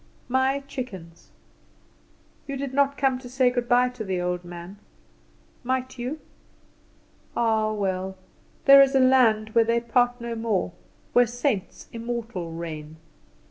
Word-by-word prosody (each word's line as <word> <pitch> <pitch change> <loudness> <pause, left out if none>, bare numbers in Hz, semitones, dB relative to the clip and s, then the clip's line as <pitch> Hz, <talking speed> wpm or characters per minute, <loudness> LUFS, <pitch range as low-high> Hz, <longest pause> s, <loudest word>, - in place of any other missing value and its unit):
"My 265 +2 +1
Chickens: 190 - -8 1.2
You 275 -1 -4
did 270 -1 -4
not 280 0 +2
come 265 -2 +1
to 250 -1 -10
say 255 0 +2
good 245 -1 -2
bye 250 0 +4
to 250 -3 -7
the 190 -3 -2
old 180 0 -2
man. 175 +3 -10 0.8
Might 260 0 -2
you? 260 +6 -4 1.2
Ah, 220 -2 +2
well, 190 -2 -2 0.5
there 275 0 +10
is 275 0 +4
a - - +5
land 245 -5 +4
where 230 +1 +4
they 230 +1 +2
part 245 +1 +1
no 235 0 -4
more, 225 -5 -1 0.4
where 245 0 +5
saints 240 -4 -2
immortal 230 -7 -4
reign. 160 -2 -7
235 Hz, 140 wpm, -25 LUFS, 195-255 Hz, 1.2 s, there